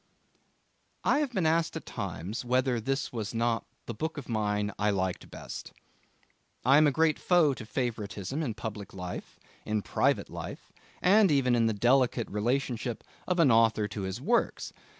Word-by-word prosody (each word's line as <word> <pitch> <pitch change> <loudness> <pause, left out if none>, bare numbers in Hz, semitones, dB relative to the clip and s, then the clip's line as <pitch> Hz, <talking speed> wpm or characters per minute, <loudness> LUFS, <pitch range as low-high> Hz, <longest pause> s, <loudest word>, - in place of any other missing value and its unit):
I 285 - +3
have 295 -4 -1
been 190 -8 0
asked 160 +1 +2
at - - -8
times 105 +10 -5
whether 125 0 +1
this 135 +5 -2
was 110 -1 -4
not 115 0 0 0.2
the 120 - -4
book 160 +8 -4
of 140 - -6
mine 105 -2 0
I 105 +1 +2
liked 95 -2 -2
best. - - -8 0.9
I 135 +3 +7
am 155 - +6
a - - +3
great 160 +3 +2
foe 170 -6 +4
to 115 -4 -9
favouritism 110 - -3
in 120 -9 -2
public 105 -4 -6
life, 90 -1 -7 0.2
in 105 -1 -1
private - - +1
life, - - -8 0.3
and 200 +2 +6
even 135 -4 +3
in 115 -1 +3
the 110 - +1
delicate 120 +2 +2
relationship 120 +2 -1 0.2
of 180 - +1
an 150 -6 +6
author 115 -2 +4
to 100 +2 -5
his 95 +3 -4
works. 235 - 0
120 Hz, 170 wpm, -29 LUFS, 105-140 Hz, 0.9 s, I